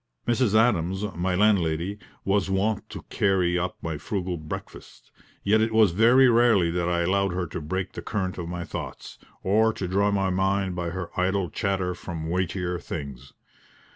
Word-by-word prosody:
Mrs. 120 -3 +2
Adams, 95 -4 +2
my 90 +2 0
landlady, 95 -1 +1 0.3
was 100 -1 +1
wont 100 +3 0
to - - -8
carry 90 -3 +2
up 90 +1 -3
my 80 -3 -3
frugal 90 +1 -3
breakfast; 75 -2 -9 0.3
yet 110 +2 +3
it 110 0 +1
was 110 -4 +5
very 120 +8 +5
rarely 115 -8 +4
that 85 0 -1
I 85 -1 +1
allowed 95 +1 +1
her 90 0 -1
to 80 - -6
break 95 +5 -3
the - - -7
current 95 -4 -3
of 85 -1 -5
my 90 0 -4
thoughts, - - -7 0.2
or 110 +4 +3
to 95 - -4
draw 100 +3 +2
my 95 -2 +1
mind 95 0 0
by 85 -1 -2
her 90 0 -5
idle 95 -1 0
chatter 95 -2 -1
from 80 -3 -6
weightier 90 0 -1
things. 70 -3 -7
95 Hz, 170 wpm, -25 LUFS, 85-100 Hz, 0.3 s, was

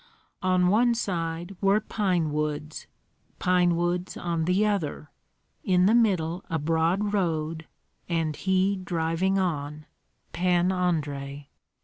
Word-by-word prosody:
On 185 -1 +3
one 235 +4 +3
side 175 -3 -3
were 200 +1 +4
pine 185 -8 -1
woods, 150 0 -3 0.5
pine 180 -1 +2
woods 175 +1 -1
on 170 -2 -2
the 185 +4 +2
other, 165 -7 -2 0.5
in 180 -1 +3
the 210 - +4
middle 185 -7 +2
a 165 - 0
broad 165 +7 0
road, 160 -4 -1 0.4
and 165 -3 0
he 190 +2 +1
driving 175 +1 0
on, 150 -5 -2 0.5
Pan 180 0 +2
Andrei! 145 -6 -2
175 Hz, 115 wpm, -26 LUFS, 160-190 Hz, 0.5 s, were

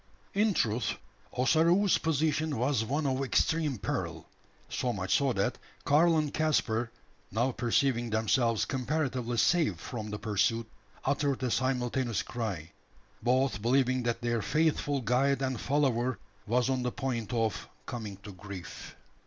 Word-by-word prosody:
In 205 -1 +2
truth, 115 -1 0 0.4
Ossaroo's 170 +9 +3
position 155 -1 0
was 125 -1 +1
one 145 +7 -1
of 135 0 0
extreme 150 +1 +1
peril - - -3 0.4
so 125 - -1
much 95 -3 -1
so 140 -2 +2
that 100 -2 -1 0.3
Karl 160 +3 +5
and 150 -2 0
Caspar 120 -7 +1 0.4
now 120 +6 +1
perceiving 120 +1 +1
themselves 110 +1 +2
comparatively 130 -3 -1
safe 155 - +3
from 110 -1 -6
the 105 - -4
pursuit 110 +2 0 0.4
uttered 140 -1 0
a 125 - 0
simultaneous 125 -2 0
cry: 100 -9 -4 0.5
both 125 -4 +1
believing 130 +2 +2
that 120 0 -1
their 120 -1 0
faithful 145 0 +1
guide 135 +4 +2
and 130 -3 -2
follower 130 -3 +1 0.3
was 125 +3 +2
on 130 -1 0
the 125 0 -1
point 120 -5 -3
of 115 -3 -1 0.2
"coming 110 -5 -6
to 105 - -8
grief." 95 -2 -9
125 Hz, 135 wpm, -30 LUFS, 115-140 Hz, 0.5 s, Karl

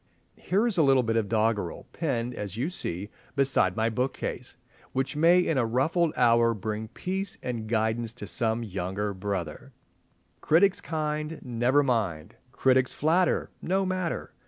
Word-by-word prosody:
Here 200 +6 +1
is 225 -7 0
a - - +7
little 135 -3 +4
bit 115 -1 0
of 110 -3 0
doggerel, 110 -5 0
pinned, 125 -7 -2
as 105 -2 -6
you 140 +9 -1
see, 100 - -4 0.2
beside 135 -10 +2
my 110 0 +1
bookcase, 125 +4 -3 0.4
which 130 +3 -1
may 170 +4 +5
in 165 -6 +1
a 120 - +2
ruffled 155 +8 +1
hour 115 -1 +4
bring 110 +2 -4
peace 190 - -4
and 115 -3 -4
guidance 110 0 0
to 120 - -7
some 115 0 -1
younger 100 0 -3
brother— 95 -5 -5 0.7
"Critics 185 +5 +4
kind—never 150 -4 0
mind! 105 - -1 0.2
Critics 130 0 +2
flatter—no 180 +3 +1
matter! 185 -2 -3
120 Hz, 140 wpm, -27 LUFS, 110-155 Hz, 0.7 s, a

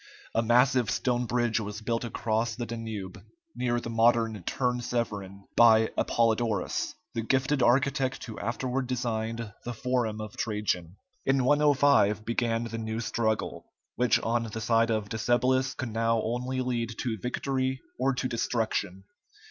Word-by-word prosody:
A 115 - +2
massive 125 0 +3
stone 125 -1 0
bridge 120 -1 +1
was 105 0 -5
built 115 +1 -1
across 115 -1 -1
the 120 - -4
Danube, 110 -5 -6 0.3
near 120 -1 0
the 115 - -6
modern 115 -2 +3
Turn 125 -2 0
Severin, 105 -5 -3
by 110 -1 +6
Apollodorus, 115 -3 0 0.2
the 115 - -1
gifted 135 +4 +1
architect 130 +2 +2
who 110 - -7
afterward 125 +3 -2
designed 115 -3 -2
the 120 0 -5
forum 120 -3 -1
of 110 -1 -7
Trajan. 100 -5 -2 0.3
In 135 -1 +2
105 140 -7 +4
began 115 0 0
the 115 -1 -5
new 110 0 -3
struggle, 110 -1 -1 0.3
which 125 -1 +3
on 115 +1 +1
the 110 0 -5
side 115 0 +2
of 110 -2 0
Decebalus 125 +4 +1
could 130 - -4
now 115 0 +2
only 125 +3 -2
lead 120 -3 -2
to 115 -4 -2
victory 130 +3 -1 0.2
or 135 0 +2
to 130 - -1
destruction. 110 -5 -1
115 Hz, 145 wpm, -28 LUFS, 110-125 Hz, 0.3 s, by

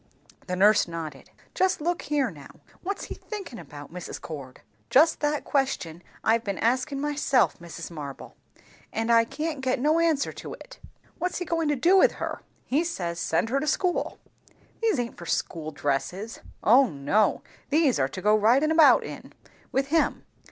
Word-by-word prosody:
The 180 - -1
nurse 205 +2 +5
nodded. 160 -5 -7 0.2
"Just 375 0 +1
look 345 +3 -1
here, 285 -6 0
now! 145 -2 -14 0.2
What's 395 +2 -4
he - - -6
thinkin' 390 - -8
about, 145 -1 -11
Mrs. 180 -1 -6
Cord?" 140 -5 -9 0.3
"Just 315 +5 +5
that 295 0 0
question 220 - -1 0.2
I've 225 +1 +3
been 200 -3 -3
askin' 255 +4 0
myself, 290 -2 +1
Mrs. 170 0 -8
Marble; 145 -4 -8 0.6
and 225 +1 -1
I 230 0 +6
can't 305 +3 -4
get 260 0 0
no 305 +5 +3
answer 325 -4 +1
to - - -8
it." - - -14 0.4
"What's 360 +2 -1
he 355 - -3
goin' 330 -1 0
to 295 - +2
do 340 +9 +4
with - - +5
her?" - - -5 0.2
"He 290 +6 +1
says, 175 - -3
send 165 +6 0
her 275 +3 +1
to 305 - -3
school." 360 +3 0 0.6
"These 445 -8 +2
aint 235 -1 -3
for 170 - -9
school 155 -2 -2
dresses." 160 +9 -3 0.2
"O 255 +5 +6
no; 145 +10 +1 0.3
these 295 -3 +3
are 135 0 +2
to 185 - -7
go 210 +1 +4
ridin' 245 +9 +4
about 320 -2 +6
in, - - -9 0.4
with 270 +1 0
him." 325 +1 +1
250 Hz, 175 wpm, -26 LUFS, -, 0.6 s, I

